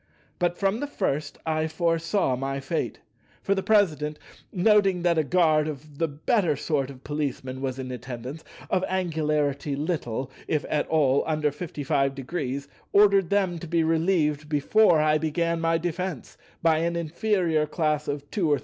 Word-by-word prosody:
But 175 -1 +1
from 195 +3 +1
the 290 - -2
first 150 - -2
I 160 0 0
foresaw 165 -1 0
my 135 +2 -3
fate; 135 - -3 0.4
for 200 - +2
the 195 - -1
President, 155 -9 +2 0.3
noting 195 -2 +3
that 170 -2 +3
a - - +3
guard 155 -1 +3
of 150 -1 -8
the 165 - +2
better 160 - +1
sort 140 -2 -1
of 135 -1 -12
Policemen 135 -3 -3
was 130 -1 -2
in 130 -1 -5
attendance, 125 +4 -7 0.3
of 185 - +2
angularity 150 -6 0
little, 135 -5 -3 0.2
if 150 -2 0
at 150 - +1
all, 140 -4 +3
under 155 -2 +1
55°, 140 -2 -2 0.2
ordered 200 -3 +5
them 190 -4 +1
to 170 - -7
be 165 0 +2
relieved 160 -2 +1
before 160 +4 +4
I 155 0 +3
began 165 +2 0
my 165 0 +2
defence, 175 -2 -4 0.3
by 160 -1 +4
an 170 +1 0
inferior 170 -2 0
class 150 -1 0
of 145 0 -4
2° 195 -7 0
or 145 -1 +3
3°. - - -8
155 Hz, 160 wpm, -26 LUFS, 145-175 Hz, 0.4 s, ordered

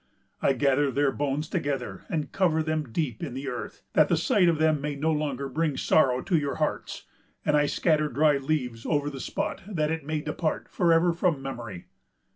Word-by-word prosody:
I 135 - +3
gather 140 +2 +2
their 140 +1 +2
bones 145 +2 -2
together, 135 - -3
and 155 -2 -2
cover 160 -4 +2
them 155 -5 -2
deep 125 -5 -2
in 120 - -5
the 135 +1 -5
earth, 125 -2 -6
that - - +5
the - - +3
sight 180 -4 +3
of 165 - +2
them 155 -2 +2
may 145 0 -2
no 155 +3 0
longer 145 -3 -1
bring 150 +1 -1
sorrow 130 -5 +3
to 175 -1 0
your 145 -2 -2
hearts; 155 - -3 0.4
and 150 - +3
I 145 0 +3
scatter 155 -2 +2
dry 150 0 +3
leaves 135 -5 -2
over 145 -1 0
the 135 - -7
spot, - - -3
that 155 -7 -1
it 160 -2 -2
may 155 +1 -2
depart 155 +1 -2
for 175 -2 +2
ever 165 +1 +4
from 170 -3 +1
memory. 120 -9 -7
150 Hz, 200 wpm, -27 LUFS, 135-155 Hz, 0.4 s, that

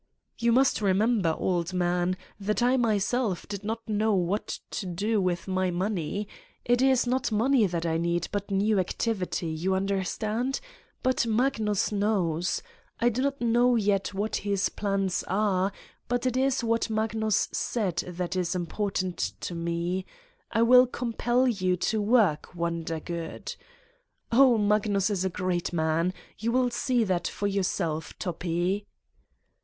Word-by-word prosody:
"You 235 0 +3
must 260 -1 +3
remember, 200 -3 +2
old 180 0 -1
man, 180 0 +1 0.2
that 210 +4 0
I 250 +2 +4
myself 220 -3 0
did 200 -1 -6
not 225 +2 -4
know 215 0 +1
what 185 +3 -1
to 190 - -4
do 205 +5 0
with 180 0 -1
my 185 -1 0
money. 190 +1 -2 0.4
It 245 +1 +3
is 265 -2 +4
not 255 +1 0
money 230 +1 +3
that 170 -1 -3
I 165 -1 +1
need 170 0 0
but 205 0 -3
new 200 +1 +2
activity. 185 -2 -1
You 175 +4 0
un 190 +1 0
derstand? 215 +6 -1 0.4
But 255 -2 +2
Magnus 220 -3 +1
knows. 190 -5 0 0.4
I 240 - +4
do 240 +2 -2
not 275 0 -1
know 240 +1 +3
yet 200 -3 +1
what 205 +2 -1
his 200 -1 0
plans 195 -2 -1
are 195 0 +1 0.4
but 245 +1 -1
it 255 -1 +1
is 265 -1 +1
what 230 0 +1
Magnus 220 -1 +1
said 195 -8 -1
that 180 +1 -3
is 180 -1 -1
important 185 0 -2 0.2
to - - -4
me: 170 +2 -2 0.4
'I 225 - +3
will 250 +2 +7
compel 245 +1 0
you 185 -6 +1
to 215 +4 0
work, 205 -8 +2
Wondergood!' 170 0 -4 0.8
Oh, 250 0 +6
Magnus 205 -1 +2
is 190 -3 0
a 190 - +1
great 180 -1 -2
man. 165 +1 +1 0.3
You 225 +3 0
will 250 0 +2
see 245 0 +1
that 185 -4 0
for 205 - -4
yourself, 180 -5 -1
Toppi!" 180 +2 -2
200 Hz, 150 wpm, -27 LUFS, 180-230 Hz, 0.8 s, will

